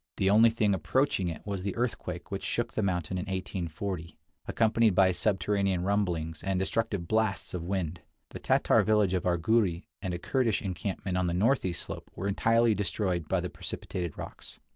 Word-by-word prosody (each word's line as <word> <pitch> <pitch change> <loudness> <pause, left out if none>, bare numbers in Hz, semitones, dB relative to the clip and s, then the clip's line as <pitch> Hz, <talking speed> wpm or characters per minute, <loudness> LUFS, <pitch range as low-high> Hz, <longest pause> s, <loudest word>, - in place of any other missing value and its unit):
The 95 0 +3
only 110 +3 +7
thing 110 -3 +1
approaching 95 - +1
it 85 - -5
was 100 -2 -3
the 100 0 -3
earthquake 120 0 -3
which - - -3
shook - - -2
the - - 0
mountain 90 -2 -1
in 90 - -4
1840, 90 -2 -4 0.3
accompanied 110 -2 +3
by 95 0 +5
subterranean 95 -1 +1
rumblings, 90 -5 0
II 85 - -10
43 - - +1
and 95 -1 +1
destructive 100 -2 -1
blasts 110 -2 0
of 85 -2 -4
wind. 90 -3 -2 0.3
The - - -8
Tatar - - +3
village 105 -3 +3
of 90 -1 0
Arghuri 90 0 +2 0.2
and 95 -2 -3
a 85 - -2
Kurdish 115 +3 0
encampment 95 0 -2
on 90 - +1
the 85 - -1
northeast 95 -3 +1
slope - - -7
were 95 - -3
entirely 115 +3 +3
destroyed 95 -4 -1
by 95 -2 +2
the 90 - -3
precipitated 85 -4 -5
rocks. - - -9
95 Hz, 185 wpm, -29 LUFS, 90-105 Hz, 0.3 s, only